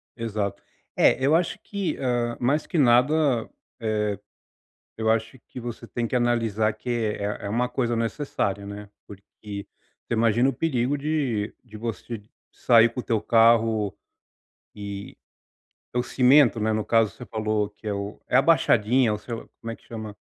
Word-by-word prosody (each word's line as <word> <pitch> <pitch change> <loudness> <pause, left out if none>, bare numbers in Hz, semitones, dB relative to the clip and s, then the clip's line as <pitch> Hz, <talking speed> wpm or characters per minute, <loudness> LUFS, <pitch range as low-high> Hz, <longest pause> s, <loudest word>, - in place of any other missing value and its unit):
Exato. 105 -4 -3 0.3
É 130 - +4
eu 145 +4 +4
acho 170 0 0
que, 200 -3 -3
ah 120 -2 -1
mais 140 +5 +1
que 175 - -2
nada, 130 0 +3 0.3
eh 105 -2 -1 0.8
eu 110 0 0
acho 115 +3 0
que 125 - -8
você 115 -1 -7
tem 120 -1 -2
que 125 - -3
analisar 115 -3 +1
que 110 +3 -8
é 105 -3 -2
é - - -3
uma 120 +3 0
coisa 120 -3 -1
necessária 115 -4 -2
né. 100 0 -8 0.2
Porque 100 -1 -12 0.8
você - - -3
imagina 115 +3 +3
o - - -2
perigo 135 -1 0
de 140 -8 -1
de 110 -4 -12
você 115 0 -5 0.3
sair 115 -1 +5
com 125 - -7
o - - -3
teu 110 -3 0
carro, 115 -3 +3 0.8
e 100 -1 -7 0.8
e - - -83
teu 125 0 +1
cimento, 125 -2 +4
né, 110 +1 +1
no 110 -1 -1
caso 115 -2 +3
você 125 - -10
falou 110 -2 -1
que 105 +1 -17
é 105 - 0
o 100 +1 -5
a 135 +2 +4
baixadinha 125 -7 +3
ou 105 - -2 0.4
como 115 - -6
é 115 - -6
que - - -27
chama? 110 -2 -8
115 Hz, 165 wpm, -25 LUFS, 105-125 Hz, 0.8 s, sair